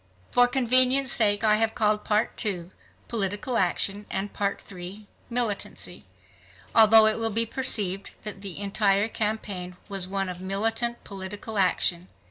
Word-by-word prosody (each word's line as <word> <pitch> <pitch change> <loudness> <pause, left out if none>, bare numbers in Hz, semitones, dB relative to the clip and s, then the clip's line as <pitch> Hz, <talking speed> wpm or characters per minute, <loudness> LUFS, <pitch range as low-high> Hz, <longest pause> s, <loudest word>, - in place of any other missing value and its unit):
For 245 0 +4
convenience 255 +1 +4
sake 205 -2 +3
I 215 -1 +4
have 220 0 0
called 210 -1 +1
Part 215 +3 0
II 185 -5 -3 0.4
"Political 205 +2 -3
Action," 195 +3 -1
and 195 +2 -4
Part 200 -1 -2
III 190 +3 -9 0.2
"Militancy," 235 -4 -3 0.7
although 220 0 +7
it 220 +1 +1
will 225 0 0
be 225 +2 +2
perceived 205 -6 0
that 210 -2 -6
the 195 -4 -6
entire 200 0 +1
campaign 205 -5 -4
was 195 -2 -4
one 195 0 -2
of 180 0 -7
militant 225 +5 -1
political 200 +2 -6
action. 180 -1 +1
210 Hz, 140 wpm, -25 LUFS, 195-225 Hz, 0.7 s, although